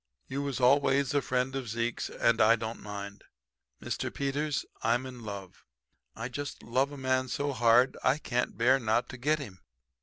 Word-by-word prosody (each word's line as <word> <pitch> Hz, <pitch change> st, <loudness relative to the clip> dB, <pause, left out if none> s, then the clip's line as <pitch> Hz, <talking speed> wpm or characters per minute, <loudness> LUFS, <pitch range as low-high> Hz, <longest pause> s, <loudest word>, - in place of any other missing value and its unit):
You 140 Hz, +1 st, -3 dB
was 140 Hz, -2 st, -3 dB
always 135 Hz, +1 st, +3 dB
a 145 Hz, -, +3 dB
friend 130 Hz, +1 st, -1 dB
of 130 Hz, -4 st, -4 dB
Zeke's, 115 Hz, +1 st, -2 dB
and 115 Hz, -1 st, +2 dB
I 115 Hz, +2 st, +7 dB
don't 115 Hz, 0 st, -5 dB
mind. 100 Hz, -1 st, -7 dB, 0.6 s
Mr. -, -, -3 dB
Peters, 140 Hz, +1 st, -1 dB, 0.2 s
I'm 120 Hz, +3 st, +1 dB
in 125 Hz, -2 st, -8 dB
love. 100 Hz, -3 st, -8 dB, 0.5 s
I 115 Hz, +1 st, -4 dB
just 140 Hz, +3 st, -6 dB
love 130 Hz, +4 st, +1 dB
a 145 Hz, -, -8 dB
man 130 Hz, -1 st, 0 dB
so 140 Hz, +2 st, -2 dB
hard 120 Hz, +2 st, +4 dB
I 140 Hz, -, +3 dB
can't 125 Hz, -8 st, -2 dB
bear 125 Hz, +4 st, +4 dB
not 115 Hz, 0 st, +1 dB
to 130 Hz, -, -8 dB
get 150 Hz, +5 st, +2 dB
him. 105 Hz, -11 st, -9 dB
125 Hz, 180 wpm, -30 LUFS, 115-135 Hz, 0.6 s, I